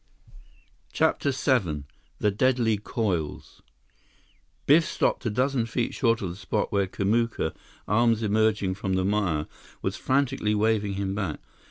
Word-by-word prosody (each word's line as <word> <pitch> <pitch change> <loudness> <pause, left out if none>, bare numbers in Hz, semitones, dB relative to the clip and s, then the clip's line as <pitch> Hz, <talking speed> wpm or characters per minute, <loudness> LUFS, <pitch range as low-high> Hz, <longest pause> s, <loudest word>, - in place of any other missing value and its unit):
CHAPTER - - +1
VII 105 - 0 0.3
The 105 - +1
Deadly 115 0 +2
Coils 100 -8 -3 1.0
Biff 155 +4 +6
stopped 135 - 0
a - - +2
dozen 125 +1 0
feet 120 +1 -2
short 115 -4 +1
of 95 - -2
the - - -8
spot 95 -1 -2
where 100 -1 +1
Kamuka, 105 -2 0 0.3
arms 115 +1 +3
emerging 105 -2 +2
from 95 0 -3
the 95 0 +1
mire, 95 -7 0 0.4
was - - -2
frantically 130 -5 +1
waving 105 -1 +1
him 95 -1 -2
back. 95 -7 -3
105 Hz, 135 wpm, -26 LUFS, 95-115 Hz, 1.0 s, Biff